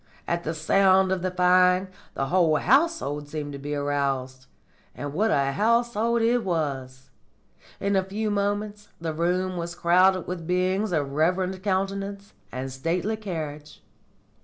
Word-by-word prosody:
"At 170 0 -1
the 160 +2 -3
sound 190 +4 +3
of 190 -2 0
the 185 - -1
firing 180 +1 +3 0.3
the 135 - -1
whole 170 -4 +3
household 205 - +1
seemed 145 -1 -5
to 140 - -7
be 145 +1 -4
aroused. 135 -3 -2 0.5
And 145 0 -5
what 215 +7 +1
a 140 -6 +2
household 235 - +1
it 240 +2 +3
was! 135 -7 -3 0.7
In 200 0 0
a 190 - +3
few 210 +3 -3
moments 205 +1 -2
the 165 -1 -3
room 180 +3 -1
was 170 0 -4
crowded 185 +2 +3
with 170 -3 -6
beings 185 +3 0
of 145 -5 -1
reverend 180 +5 0
countenance 195 +1 -2 0.2
and 130 +3 -5
stately 175 +10 -1
carriage. 155 -8 -7
180 Hz, 145 wpm, -25 LUFS, 150-200 Hz, 0.7 s, sound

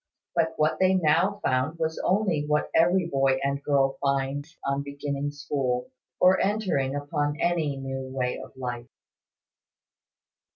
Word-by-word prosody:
But 165 -1 +1
what 155 0 +1
they 190 0 +4
now 180 +4 +2
found 130 +5 0
was 160 0 -2
only 185 -6 +1
what 150 0 0
every 175 +2 +4
boy 135 -4 +2
and 140 0 -1
girl 135 -1 +2
finds, 140 +3 -1
on 140 0 0
beginning 140 0 -3
school, 140 -4 -2 0.3
or 185 +1 +5
entering 185 -10 0
upon 145 +1 -2
any 160 -5 0
new 135 0 -5
way 125 -1 -2
of - - -14
life. 120 -2 -5
145 Hz, 135 wpm, -26 LUFS, 135-165 Hz, 0.3 s, or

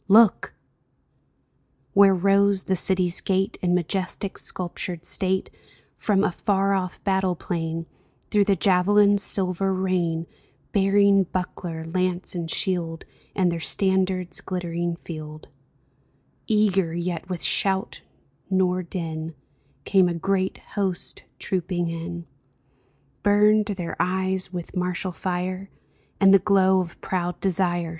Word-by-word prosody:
Look! 215 +1 +5 0.7
" - - -43
Where 195 -1 +6
rose 195 +1 +3
the 190 - 0
city's 180 -1 +2
gate 190 0 -1
In 180 -1 +2
majestic, 185 +3 -2
sculptured 175 -1 -4
state, 190 0 0 0.4
From 200 -2 +1
a 210 - +2
far 195 +2 +1
off 185 -2 -3
battle 190 -2 +1
plain, 165 -1 -3 0.5
Through 205 -1 +4
the 200 - +3
javelins' 200 +3 +4
silver 190 0 +1
rain 180 -3 -1 0.5
Bearing 200 0 +4
buckler, 175 -2 -4
lance, 180 +2 -2
and 170 -2 -4
shield, 165 -2 -1 0.3
And 185 -3 +2
their 170 - -3
standard's 185 -1 0
glittering 175 -2 -3
field, 155 -2 -9 1.0
Eager, 195 -6 +2
yet 175 0 -4
with 180 -3 -4
shout 190 -1 0 0.5
nor 185 -1 +1
din, 165 -2 -5 0.5
Came 190 -3 +4
a 170 - -2
great 190 +2 -1 0.2
host 195 -4 -3
trooping 175 -2 -2
in. 170 +1 -6 1.0
Burned 210 +1 +4
their 185 -5 -4
eyes 190 0 +1
with 175 0 -7
martial 180 +1 -1
fire. 185 +2 -3 0.5
And 195 -1 +6
the 195 - +7
glow 190 -1 +3
of 175 -2 -5
proud 180 -1 -2
desire. 175 -2 0
185 Hz, 120 wpm, -24 LUFS, 175-195 Hz, 1.0 s, the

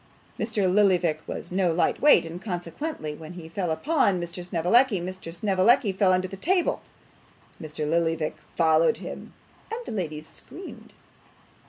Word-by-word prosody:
Mr. 215 -2 -1
Lillyvick 185 -4 +3
was 170 - -6
no 185 -2 +2
light 165 +2 +1
weight, 295 - +6
and 165 +2 -7
consequently 175 - -4
when 160 +2 -10
he 175 -2 -9
fell 175 +2 -3
upon 200 - +1
Mr. 175 +1 -6
Snevellicci, 185 +6 +3
Mr. 185 -1 -6
Snevellicci 200 +6 +3
fell 190 0 +2
under 185 0 +1
the 195 - -8
table. 350 - +1 0.8
Mr. 155 -1 -4
Lillyvick 165 -1 0 0.2
followed 165 +6 +4
him, - - -8 0.4
and 450 - -3
the - - -6
ladies 155 -7 -4
screamed. 370 - -12
180 Hz, 145 wpm, -26 LUFS, 165-205 Hz, 0.8 s, weight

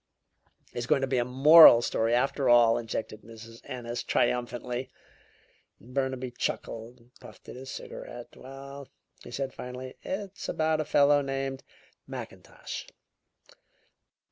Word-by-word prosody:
"It's 120 0 -4
going 135 - +3
to 135 - 0
be 130 -1 +1
a - - +2
moral 135 0 +8
story, 115 0 +1
after 135 +1 +1
all," 120 -1 +5
interjected 110 -2 -5
Mrs. 115 +1 -13
Ennis 120 -3 -5
triumphantly. 125 +1 -1 0.9
Burnaby 130 +1 -3
chuckled 115 0 -4
and 120 +1 -25
puffed - - -15
at - - -8
his 130 +1 -9
cigarette. - - -9
"Well," 135 +1 -10 0.4
he - - -11
said 135 -1 -4
finally, 125 +1 -8
"it's 195 0 -6
about 155 0 +1
a - - -4
fellow 145 0 +4
named 135 -1 -4 0.4
Mackintosh." - - -8
130 Hz, 125 wpm, -28 LUFS, 120-140 Hz, 0.9 s, moral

